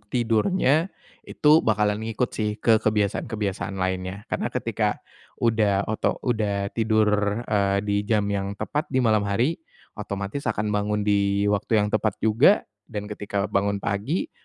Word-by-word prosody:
tidurnya, 130 - +2 0.4
itu 155 +2 +4
bakalan 105 -1 +1
ngikut 115 +2 -2
sih 105 -1 -1
ke 110 0 +3
kebiasaan-kebiasaan 105 -1 -1
lainnya. 95 +1 -3
Karena - - -1
ketika - - -1 0.5
udah 105 -4 +2
oto 110 - 0
udah 100 -5 -1
tidur, 110 -1 +1
eee, 100 -3 +1
di 100 -1 0
jam 105 -2 +2
yang 100 0 -2
tepat 150 +8 -3
di 130 -1 +1
malam 110 -3 +2
hari, 120 +11 0 0.4
otomatis 100 +7 -4
akan 105 0 -1
bangun 105 0 0
di 100 -1 +2
waktu 105 +2 +1
yang 105 - 0
tepat 110 -2 0
juga. 115 - +4 0.2
Dan 105 -2 -6
ketika 100 -1 -3
bangun 100 0 0
pagi, 140 - -2
105 Hz, 140 wpm, -24 LUFS, 100-115 Hz, 0.5 s, itu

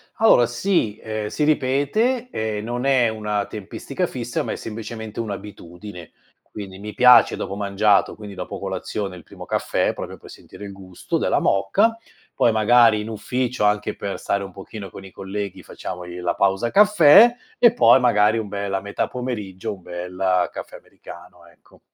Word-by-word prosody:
Allora, 215 - +5
sì, 120 - -1
ehm, 110 -1 -4
si 150 - -2
ripete, 155 - +1
ehm, 110 -1 -3
non 120 +3 -3
è 130 -4 +3
una 105 -2 -2
tempistica 105 -3 -5
fissa, - - -4
ma - - -4
è - - -3
semplicemente 110 0 -7
un'abitudine. 100 -3 -8 0.4
Quindi 95 -3 -8
mi 105 +1 -7
piace 125 -2 +6
dopo 100 - -5
mangiato, 100 0 +2
quindi 105 -2 -10
dopo 90 - -6
colazione 95 0 -4
il 85 - -12
primo - - -12
caffè, - - 0
proprio - - -7
per - - -15
sentire 105 - -12
il 100 - -8
gusto 95 -2 -5
della - - +1
moka. 200 - +2 0.4
Poi 120 - +3
magari 110 0 +4
in 110 - -6
ufficio, 120 +3 -2
anche 105 0 +1
per 100 -1 -5
stare 100 0 -1
un 95 - -8
pochino 100 +1 -9
con 95 - -11
i 95 - -12
colleghi, 100 0 -6
facciamo 90 - -7
lì 90 0 -9
la 90 - -1
pausa 100 +4 +1
caffè 210 +2 +7 0.2
e 235 -1 +5
poi 185 - +6
magari 110 -2 +3
un 110 -2 -3
bel 100 -1 -4
a 95 - -1
metà 100 +1 -3
pomeriggio 105 -8 -5
un 95 - -19
bel 90 +1 -1
caffè - - -9
americano, 85 0 -14
ecco. 85 - -23
105 Hz, 170 wpm, -22 LUFS, 95-120 Hz, 0.4 s, caffè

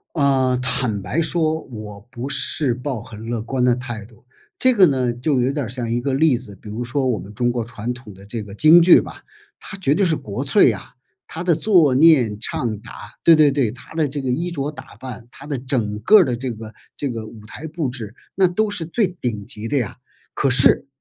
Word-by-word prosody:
啊， 135 -4 +2
坦 125 -4 0
白 150 - -1
说 160 -1 0
我 105 -5 -9
不 125 +1 -6
是 140 -2 +2
抱 125 -1 -4
很 110 -3 -10
乐 120 -2 -2
观 125 +3 -2
的 125 -1 +4
态 120 -4 -6
度。 115 +2 -21 0.3
这 255 0 +4
个 200 -4 +6
呢， 130 -5 +1
就 125 +3 0
有 125 +2 +1
点 145 0 -2
儿 - - -6
像 120 -1 -3
一 120 +1 -1
个 135 - -1
例 140 0 +3
子， 115 -4 -8
比 105 - -14
如 110 +4 -4
说 130 +2 -1
我 120 -4 0
们 100 - -10
中 120 +3 0
国 120 -1 -2
传 115 +1 -5
统 120 -4 -12
的 95 +1 -15
这 110 +2 -5
个 100 -1 -10
京 155 +9 +7
剧 175 +1 +7
吧， - - -10 0.4
它 200 - -8
绝 145 -7 +1
对 195 - +2
是 170 -3 +2
国 100 -9 -5
粹 - - +5
啊， - - -8 0.3
它 165 - -6
的 175 -2 +2
坐、 165 -5 +3
念、 130 -8 +4
唱、 110 0 -3
打 115 - -11 0.3
对 165 - +8
对 155 -2 +5
对， 135 -6 0
它 130 +5 -13
的 160 -2 +1
这 145 +1 -5
个 135 - -4
衣 170 +8 -2
着 145 -4 -3
打 150 - -12
扮， 125 0 -9
它 140 - -12
的 145 -2 -3
整 120 -5 -2
个 215 - +6
儿 190 - +5
的 125 -4 -2
这 125 0 -4
个 110 0 -10 0.2
这 145 - -3
个 115 -3 -5
舞 110 -1 -13
台 150 +8 -8
布 160 -2 -3
置， 115 -4 -6 0.2
那 190 0 +4
都 210 +5 0
是 205 -5 -3
最 190 +5 0
顶 120 - -5
级 105 +2 -3
的 140 +4 0
呀。 120 -7 -4 0.4
可 140 - +1
是 125 - +5
130 Hz, 255 characters per minute, -20 LUFS, 115-155 Hz, 0.4 s, 对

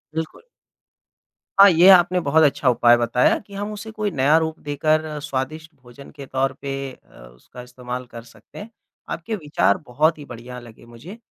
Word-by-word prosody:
बिल्कुल। 160 - -6 1.2
हाँ, 200 0 +9
ये 175 +1 +5
आपने 180 0 +4
बहुत 160 -1 +2
अच्छा 140 -2 +2
उपाय 120 -1 +4
बताया, 120 +1 +1
कि 200 0 -18
हम 205 +1 -5
उसे 210 +1 -9
कोई 210 -1 -3
नया 145 +2 +3
रूप 160 0 -2
देकर 155 +1 -1
स्वादिष्ट 150 +3 -5
भोजन 125 +3 -14
के 140 -2 -11
तौर 130 0 -2
पे 140 0 -5 0.2
अ, - - -22 0.2
उसका 95 - -14
इस्तेमाल 125 0 -8
कर 115 -1 -10
सकते 115 -2 -19
हैं। 205 +2 -10 0.4
आपके 220 +7 -4
विचार 145 - 0
बहुत 155 +6 +1
ही 145 - -11
बढ़िया 125 0 -10
लगे 115 -1 -16
मुझे। 120 - -12
145 Hz, 175 wpm, -21 LUFS, 125-165 Hz, 1.2 s, हाँ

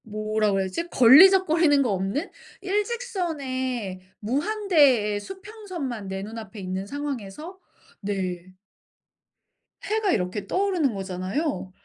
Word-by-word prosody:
뭐라고 215 -1 -1
그래야지? 195 - -2
걸리적거리는 320 +2 +6
거 240 - 0
없는 195 - -2 0.3
일직선의, 320 - -3 0.2
무한대의 280 - +2
수평선만 370 - -7
내 190 0 -4
눈앞에 215 -1 -8
있는 185 0 -4
상황에서 285 - -6 0.4
네. 185 -3 -4 1.3
해가 430 -2 0
이렇게 195 - -2
떠오르는 365 - +1
거잖아요. 190 - -3
255 Hz, 265 characters per minute, -25 LUFS, -, 1.3 s, 걸리적거리는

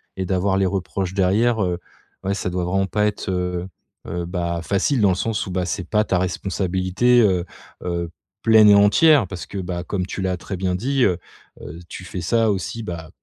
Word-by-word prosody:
et 95 - -3
d'avoir 95 +1 +1
les 95 - +2
reproches 95 0 -3
derrière, 105 +4 +2
heu. 90 -1 -1 0.4
Ouais, 100 - 0
ça 95 - -2
doit 90 0 -1
vraiment 95 +2 +1
pas 105 +2 0
être, 105 -2 -4
heu 90 0 -2 0.4
heu, 85 0 -3
bah, 85 -1 -2
facile, 105 - +1
dans 100 - +5
le 90 - +2
sens 110 +2 -2
où, - - -5
bah, 90 0 -1
c'est 90 0 -4
pas 105 0 +3
ta 95 -4 0
responsabilité, 95 +5 +1
heu 95 -5 +2 0.4
heu, 85 -1 -3 0.3
pleine 110 -2 +7
et 100 - +8
entière 115 +7 +5
parce 90 -1 -7
que, 100 - -7
bah, 90 -2 -4
comme 90 0 -2
tu 95 - -5
l'as 95 -1 -1
très 95 - -6
bien 90 0 -1
dit, 130 +7 0
heu 90 -5 +3 0.4
heu, 80 +4 -9
tu 90 - -8
fais 90 - -5
ça 115 +5 +2
aussi, 105 +4 -3
bah, 85 -5 -6
95 Hz, 210 wpm, -22 LUFS, 90-105 Hz, 0.4 s, et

